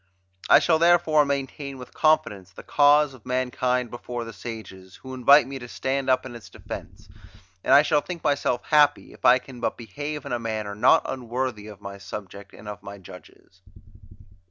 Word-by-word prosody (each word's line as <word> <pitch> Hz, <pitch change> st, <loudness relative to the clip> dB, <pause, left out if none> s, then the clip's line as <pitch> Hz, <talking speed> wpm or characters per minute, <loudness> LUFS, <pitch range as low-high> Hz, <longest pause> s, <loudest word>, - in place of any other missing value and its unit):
I -, -, +9 dB
shall 160 Hz, -2 st, +2 dB
therefore 165 Hz, -3 st, +4 dB
maintain 140 Hz, 0 st, -4 dB
with 125 Hz, -1 st, -11 dB
confidence 155 Hz, -, +1 dB
the 95 Hz, -, -13 dB
cause 145 Hz, 0 st, +4 dB
of 125 Hz, -4 st, -16 dB
mankind 125 Hz, -1 st, -1 dB
before 120 Hz, 0 st, -6 dB
the 115 Hz, 0 st, -9 dB
sages, 95 Hz, -6 st, -9 dB
who 130 Hz, 0 st, -10 dB
invite 130 Hz, +2 st, +6 dB
me 135 Hz, +1 st, -7 dB
to 125 Hz, -, -9 dB
stand 135 Hz, +2 st, -2 dB
up 130 Hz, 0 st, +2 dB
in 130 Hz, -, -8 dB
its 120 Hz, -2 st, -11 dB
defence; -, -, -10 dB, 0.6 s
and -, -, -1 dB
I 140 Hz, +2 st, +8 dB
shall 150 Hz, 0 st, +2 dB
think 175 Hz, 0 st, -8 dB
myself 140 Hz, -4 st, 0 dB
happy, 145 Hz, -1 st, +2 dB
if -, -, -11 dB
I 125 Hz, -, +7 dB
can 130 Hz, -1 st, -12 dB
but 120 Hz, -, -2 dB
behave 145 Hz, +6 st, -6 dB
in 140 Hz, -, -6 dB
a 120 Hz, -, -1 dB
manner 110 Hz, -3 st, -4 dB
not 105 Hz, -, +4 dB
unworthy 125 Hz, -3 st, -4 dB
of 105 Hz, -1 st, -12 dB
my 100 Hz, 0 st, -8 dB
subject 100 Hz, 0 st, -9 dB
and 105 Hz, -, -14 dB
of 105 Hz, -1 st, -7 dB
my 100 Hz, +1 st, -9 dB
judges. 95 Hz, 0 st, -16 dB
125 Hz, 185 wpm, -24 LUFS, 110-140 Hz, 0.6 s, I